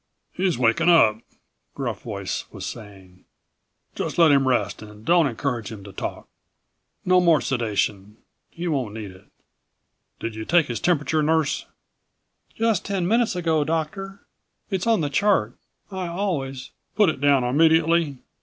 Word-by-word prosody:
"He's 185 -4 0
waking 120 +7 +2
up," 110 -11 +5 0.6
Gruff - - -4
Voice - - -4
was - - -7
saying. 95 -4 -10 0.7
"Just - - -4
let 165 -3 +6
him 135 -2 +3
rest 110 -6 0
and 105 0 -13
don't 170 0 +4
encourage 120 -3 -3
him 105 -3 -9
to 100 -1 -11
talk. - - -6 0.8
No 185 0 +4
more 170 -4 +4
sedation 105 -4 -2 0.3
he 175 +1 -6
won't 130 -9 -2
need 105 -3 -6
it. 95 0 -17 0.9
Did 115 - -4
you 110 0 -6
take 170 +5 +3
his 120 -3 -4
temperature, 155 -2 +1
Nurse?" 160 -1 0 0.9
"Just 225 -4 +1
ten 195 -4 -2
minutes 230 0 +2
ago, 165 -4 +1
Doctor. 195 +6 -4 0.5
It's 190 +2 -1
on 225 -6 +3
the 145 - -1
chart. 140 - +2 0.4
I 190 -2 -4
always 155 -8 -3
" - - -49
"Put 210 -5 +4
it 140 - -4
down 140 -3 +4
immediately? 160 +2 +3
150 Hz, 150 wpm, -23 LUFS, 115-175 Hz, 0.9 s, let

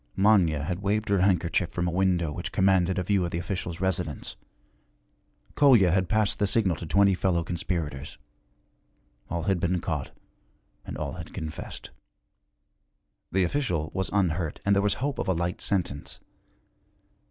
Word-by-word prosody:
Manya 95 -7 +3
had 90 +3 -3
waved 105 +2 0
her 100 -1 +3
handkerchief 90 -3 +2
from 90 0 -2
a - - 0
window 90 -3 +1
which - - -5
commanded 95 -1 +2
a 90 - 0
view 100 0 +1
of 85 - -1
the 85 - -3
official's 85 -1 -4
residence; 95 -2 -2 1.2
Kolya 120 - +5
had 95 0 +1
passed 110 -2 +1
the 100 - +2
signal 95 -4 +2
to 85 - -7
twenty 100 +3 +4
fellow 90 -2 +1
conspirators. 80 -5 -4 1.1
All 85 0 -2
had 95 -3 +1
been 90 +1 0
caught 80 -5 -3 0.8
and - - -6
all - - -3
had - - -9
confessed. 80 -1 -7 1.4
The 95 +1 +2
official 85 - -1
was 95 - -1
unhurt 90 -5 0
and 100 0 +4
there 100 - +3
was 105 0 +1
hope 140 +2 -3
of - - -2
a 95 - +3
light 85 +1 -2
sentence. 85 -7 -2
90 Hz, 155 wpm, -27 LUFS, 85-100 Hz, 1.4 s, Kolya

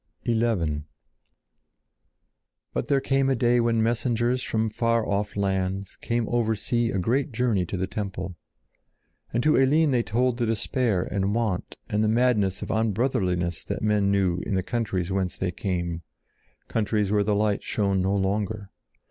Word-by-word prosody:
XI 110 -11 +1 1.9
But - - -2
there 140 - +3
came 135 0 +1
a 135 - +3
day 120 0 +3
when 115 -1 +2
messengers 120 +1 +1
from 110 -3 -1
far 115 0 +1
off 100 +1 -1
lands 95 -1 -1
came 120 -1 -1
over 115 -2 +1
sea 115 +2 0
a 95 - -1
great 130 - 0
journey 110 -7 +1
to 95 - -3
the 95 - 0
temple. 95 -3 -5 1.0
And 120 +1 0
to 155 - +4
Eline 145 +3 +4
they 125 -2 +3
told 120 +3 0
the 120 - +1
despair 110 -2 0
and 100 +2 -1
want 110 -6 -1
and 105 +1 0
the - - +2
madness 110 -4 +2
of - - -7
unbrotherliness 95 -6 0
that - - -4
men 105 -2 +2
knew 95 -3 +2
in 100 - -2
the 95 - 0
countries 95 -5 -2
whence 95 -1 -1
they 90 -1 -1
came, 85 -2 -3 0.7
countries 105 -2 0
where 105 -1 +3
the 105 0 +1
light 105 -1 +1
shone 100 -3 0
no 95 +2 +1
longer. 100 +1 -1
105 Hz, 160 wpm, -26 LUFS, 95-120 Hz, 1.9 s, to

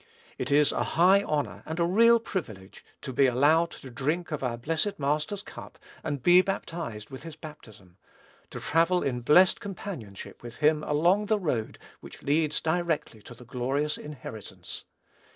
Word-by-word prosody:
It - - -3
is 145 +1 +4
a - - -1 0.2
high 185 +4 +6
honor 150 -7 -2
and 160 +2 -5
a 170 - +3
real 230 +6 +5
privilege 110 - -6 0.2
to 130 - -5
be 135 +2 +4
allowed 150 +7 +3
to 130 - -11
drink 155 +7 -2
of 150 - -3
our 125 -3 -2
blessed 165 - -2
Master's 150 +8 -1
cup, - - -11 0.3
and 145 -4 -3
be 175 +1 +7
baptized 165 - -5
with 130 - -8
his 165 -2 -9
baptism; 105 - -13 0.5
to - - -7
travel 165 +3 +2
in 125 -3 -2
blest 175 +9 +5
companionship 175 - -8
with 120 -1 -9
him 150 0 +2
along 175 +9 +2
the 215 - +2
road 135 - -2 0.2
which - - -13
leads 150 +1 +1
directly 160 -8 -1
to 120 - -12
the 125 - -14
glorious 135 +5 -1
inheritance. 130 -8 -9
150 Hz, 165 wpm, -27 LUFS, 125-175 Hz, 0.5 s, be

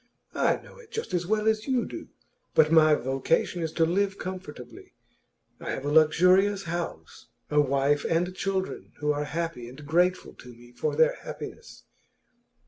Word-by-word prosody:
I - - +2
know - - -16
it 460 -3 -16
just 450 - -5
as 175 -1 -1
well 215 +1 +1
as 220 +1 +1
you 255 -3 +1
do. - - -8 0.5
But 155 0 +5
my 155 -2 +6
vocation 135 +7 0
is 160 -1 -2
to 165 - +3
live 195 +3 0
comfortably. 150 -10 -8 0.6
I - - -7
have 135 - -4
a 145 - -1
luxurious 180 +6 +4
house, 170 - -6 0.2
a 150 0 +5
wife 140 +1 +1
and 175 +2 +1
children 190 0 -3
who 150 0 0
are 145 0 -2
happy 160 -7 -4
and 140 +4 -12
grateful 180 +4 +1
to - - -15
me 120 0 -15
for 120 - -2
their 480 +1 +4
happiness. - - -9
165 Hz, 165 wpm, -27 LUFS, 145-190 Hz, 0.6 s, my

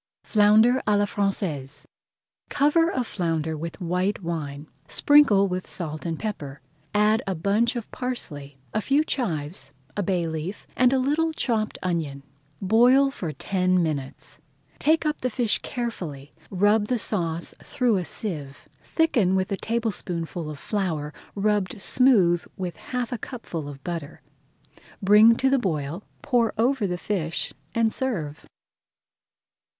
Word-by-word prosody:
FLOUNDER 220 +4 +5
À 210 -1 +4
LA 205 - +3
FRANÇAISE 180 -10 -2 0.6
Cover 300 +4 +3
a 255 -6 -1
flounder 165 -7 -2
with 165 +2 -6
white 180 +3 -1
wine, 150 -4 -4 0.2
sprinkle 250 - +5
with 185 0 -3
salt 155 -2 -5
and 165 -1 -2
pepper, 145 -10 -5 0.3
add 210 +2 +3
a 190 - -1
bunch 205 +8 +1
of 235 -2 -5
parsley, 145 - -5 0.2
a 215 - +1
few 280 +6 +2
chives, 165 - -3 0.2
a 205 - 0
bay 180 -3 0
leaf, 160 +5 -5
and 250 0 +4
a 265 - +3
little 300 +5 +1
chopped 225 -8 -1
onion. 160 -6 -2 0.4
Boil 245 +7 +5
for 175 - -4
ten 185 +1 +1
minutes. 145 -5 -4 0.4
Take 315 +2 +3
up 300 0 -1
the 255 - 0
fish 235 -2 0
carefully, 170 - -5 0.2
rub 205 +2 +3
the 250 - +1
sauce 170 -6 -1
through 240 -5 +1
a 180 - -1
sieve, 150 -7 -5
thicken 235 - +2
with 190 0 0
a - - +2
tablespoonful 180 -8 -3
of 150 - -6
flour 160 -5 -2 0.2
rubbed 205 -1 0
smooth 195 -8 +4
with 180 -3 -4
half 250 -1 -4
a 245 - -3
cupful 175 - -6
of 135 -1 -11
butter, 170 -5 -6 0.8
bring 210 +3 +7
to 265 - +1
the 270 0 +3
boil, 160 -4 -2 0.2
pour 240 -5 +2
over 240 -1 +2
the 180 -1 -2
fish, 175 -4 -2 0.2
and 230 -1 +2
serve. 175 - -3
195 Hz, 140 wpm, -25 LUFS, 165-235 Hz, 0.8 s, bring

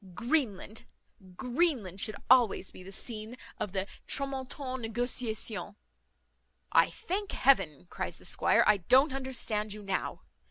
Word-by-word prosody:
Greenland 230 - -1 0.5
Greenland 245 - 0
should 215 -2 +3
always 240 -6 +4
be - - -12
the 190 +1 -10
scene 220 +3 -6 0.2
of 205 - -2
the 190 0 -1 0.2
tramontane 265 -1 -2
negociation." 225 -2 -2 1.0
"I - - +5
thank 405 -1 -4
Heaven," 195 - +3
cries - - -4
the - - -17
squire, - - +3
"I 210 - +5
don't 260 - +4
understand 235 -6 -1
you 210 0 -9
now. 195 -1 -3
235 Hz, 125 wpm, -30 LUFS, 205-265 Hz, 1.0 s, I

